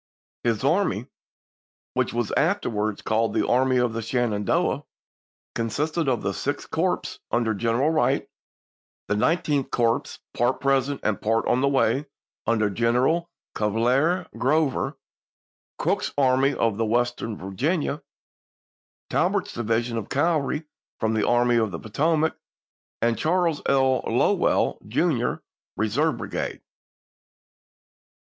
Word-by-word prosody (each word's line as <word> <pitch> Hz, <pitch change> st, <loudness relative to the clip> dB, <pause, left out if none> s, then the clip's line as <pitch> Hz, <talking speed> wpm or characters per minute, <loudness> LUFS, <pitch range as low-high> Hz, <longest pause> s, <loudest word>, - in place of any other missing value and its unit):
His 115 Hz, -1 st, 0 dB
army, 145 Hz, -, +1 dB, 0.9 s
which -, -, 0 dB
was 120 Hz, -2 st, -2 dB
afterwards 115 Hz, -, 0 dB
called 110 Hz, +1 st, 0 dB
the -, -, +1 dB
Army 130 Hz, +1 st, +3 dB
of 125 Hz, -2 st, +1 dB
the 115 Hz, -, -3 dB
Shenandoah, 115 Hz, -3 st, 0 dB, 0.7 s
consisted 150 Hz, +7 st, -1 dB
of 125 Hz, -3 st, 0 dB
the -, -, -1 dB
Sixth -, -, -4 dB
Corps, -, -, -1 dB
under 115 Hz, -2 st, +1 dB
General 120 Hz, +8 st, +1 dB
Wright; 155 Hz, -, +1 dB, 0.8 s
the -, -, +1 dB
Nineteenth 150 Hz, -5 st, +1 dB
Corps, 115 Hz, -1 st, +2 dB, 0.3 s
part 120 Hz, +2 st, +1 dB
present 135 Hz, 0 st, +1 dB
and 110 Hz, -3 st, 0 dB
part 115 Hz, +1 st, +1 dB
on 125 Hz, +1 st, +2 dB
the 140 Hz, -, +3 dB
way, 140 Hz, +1 st, +2 dB, 0.4 s
under 110 Hz, -3 st, +2 dB
General 125 Hz, -, +1 dB, 0.2 s
Cuvier 125 Hz, -, +1 dB
Grover; 140 Hz, 0 st, +1 dB, 0.8 s
Crook's -, -, 0 dB
Army 135 Hz, 0 st, +3 dB
of 115 Hz, -2 st, 0 dB
Western 115 Hz, -1 st, 0 dB
Virginia; 145 Hz, -, -1 dB, 1.1 s
Tor -, -, +3 dB
bert's -, -, -2 dB
division 115 Hz, 0 st, -1 dB
of 105 Hz, -, -8 dB
cavalry 150 Hz, 0 st, +1 dB, 0.4 s
from 110 Hz, 0 st, +1 dB
the 110 Hz, -1 st, +1 dB
Army 120 Hz, 0 st, +3 dB
of 110 Hz, -2 st, +2 dB
the 85 Hz, -, -5 dB
Poto 150 Hz, +10 st, 0 dB
mac, 160 Hz, +1 st, +1 dB, 0.7 s
and 115 Hz, -1 st, +1 dB
Charles 165 Hz, -1 st, +1 dB
R. 130 Hz, -1 st, +3 dB
Lowell, -, -, +2 dB
Jr.'s -, -, +1 dB, 0.4 s
reserve 140 Hz, +9 st, +1 dB
brigade. -, -, -4 dB
125 Hz, 120 wpm, -25 LUFS, 115-145 Hz, 1.1 s, Army